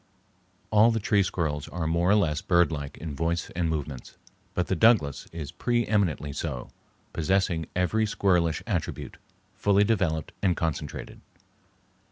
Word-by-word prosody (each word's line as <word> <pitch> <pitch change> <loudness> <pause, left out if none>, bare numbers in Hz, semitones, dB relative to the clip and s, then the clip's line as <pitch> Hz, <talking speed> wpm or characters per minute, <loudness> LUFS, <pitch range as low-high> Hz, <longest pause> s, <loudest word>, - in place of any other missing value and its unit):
All 110 +2 +6
the 115 -1 +1
tree 105 -1 +2
squirrels 80 -6 -2
are 85 -2 -4
more 85 +3 +1
or 105 - +6
less 80 -7 +1
birdlike 80 -5 +1
in 80 -3 -6
voice 85 +2 -1
and 85 -1 -1
movements, 75 -4 -5 0.4
but 90 - +1
the 95 - -1
Douglas 95 - +3
is 80 -4 -6
pre 120 -1 0
eminently 85 -9 0
so, 60 -2 -4 0.4
possessing 85 -1 0
every 110 +5 +1
squirrelish 90 -6 +1
attribute, - - -3 0.4
fully 100 0 +3
developed 90 -8 0
and 90 -4 +2
concentrated. 80 -4 -4
85 Hz, 140 wpm, -27 LUFS, 80-100 Hz, 0.4 s, All